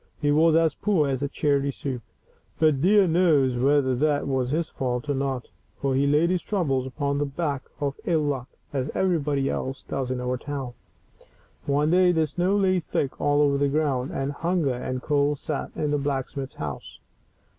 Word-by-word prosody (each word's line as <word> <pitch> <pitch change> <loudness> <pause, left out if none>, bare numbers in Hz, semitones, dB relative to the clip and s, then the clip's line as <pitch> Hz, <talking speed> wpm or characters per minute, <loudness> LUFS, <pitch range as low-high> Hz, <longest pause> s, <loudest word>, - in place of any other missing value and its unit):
He 145 - +1
was 160 +2 +4
as 165 -2 +3
poor 185 -7 +1
as 135 0 -1
charity 140 -1 +1
soup; 135 -2 -4 0.6
but 155 -4 +3
dear 200 +3 +5
knows 160 -7 +3
whether 135 +1 +3
that 145 +3 +1
was 130 -2 0
his 160 +3 0
fault 125 0 -3
or 145 - +1
not, 135 -2 -2 0.3
for 135 -1 0
he 140 +2 +2
laid 150 +5 +3
his 180 -1 0
troubles 135 -10 -1
upon 140 +1 -2
the 145 - +1
back 140 -1 -3
of 140 -1 -2
ill 160 -3 +2
luck, 135 -4 -2 0.3
as 135 0 -1
everybody 150 -7 +1
else 130 0 -3
does 130 -2 -3
in 130 -1 -2
our 125 0 -1
town. 135 -2 -5 0.9
One 145 +2 +2
day 180 0 +5
the 160 -2 +2
snow 180 +6 0
lay 185 -2 +3
thick 145 -4 -3
all 145 0 +3
over 140 -1 +3
the 140 0 +2
ground, 140 -3 0
and 135 +1 -2
hunger 165 -2 0
and 125 +1 -4
cold 145 0 +1
sat 150 +1 -4
in 150 -1 -1
the 145 - +1
blacksmith's 135 -1 -3
house. 75 -3 -6
145 Hz, 185 wpm, -25 LUFS, 135-155 Hz, 0.9 s, dear